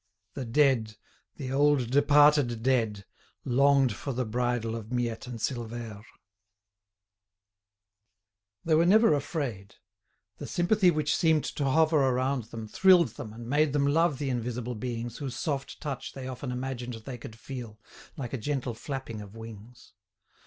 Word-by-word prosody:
The 135 - -5
dead, 115 -4 +2 0.4
the 130 -3 -5
old 140 -3 +2
departed 145 -4 +4
dead, 110 -6 +1 0.4
longed 135 0 +4
for 140 - -4
the 125 +1 -1
bridal 120 0 -1
of 110 0 -8
Miette 120 -1 -2
and 125 -2 -6
Silvère. 115 -3 -4 2.6
They 165 - +2
were 165 +2 +4
never 220 -1 +6
afraid. 135 - -3 0.6
The - - -6
sympathy 185 +2 +3
which 155 -3 +1
seemed 160 -3 +3
to 145 - -3
hover 155 +3 +3
around 130 -1 0
them 110 -1 -8
thrilled 180 - +5
them 125 -7 -8
and 115 +1 -9
made 145 +2 +2
them 145 -1 +2
love 150 0 +2
the 140 -1 -2
invisible 125 0 -3
beings 120 0 -5
whose 135 -4 -4
soft 140 -1 -3
touch 140 -4 -5
they 130 -1 -7
often 130 0 -5
imagined 125 -1 -4
they 120 +3 -8
could 110 - -9
feel, 115 -3 -8 0.4
like 130 -4 -5
a 135 - -2
gentle 130 0 -2
flapping 125 -3 -6
of 105 +1 -11
wings. 115 +1 -12
130 Hz, 145 wpm, -28 LUFS, 115-145 Hz, 2.6 s, never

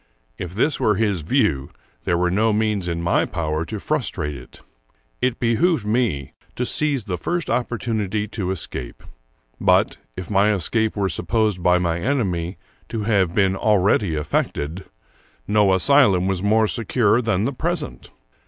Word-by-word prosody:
If 90 0 -6
this 145 +7 +1
were 105 - +2
his 100 -4 0
view, 80 - +1 0.4
there 85 - +1
were 90 0 +1
no 110 +4 +2
means 105 -3 0
in 85 -1 -2
my 85 - +2
power 80 -1 -2
to - - -6
frus - - -1
trate 75 -1 -4
it. 60 -1 -13 0.6
It 125 -1 0
behooved 120 - +1
me 105 - -1 0.2
to 125 - -1
seize 145 -3 +2
the 90 -3 -4
first 175 -1 -2
opportunity 110 -4 -1
to 100 -4 -3
escape; 80 -9 -5 0.6
but, - - +3 0.2
if 90 - -6
my 105 +1 +3
escape 110 +4 0
were 100 -2 0
supposed 105 +1 0
by 90 +1 +4
my 85 -2 -1
enemy 95 -8 -1 0.3
to 110 -2 -3
have 100 -5 +1
been 95 -2 +3
already 100 -3 +2
effected, 75 +3 -2 0.6
no 105 -2 +3
asylum 95 -2 +4
was 95 -1 -1
more 110 +2 +3
secure 115 0 +2
than 110 -3 0
the 140 - -1
present. 160 +3 -4
100 Hz, 155 wpm, -22 LUFS, 90-115 Hz, 0.6 s, by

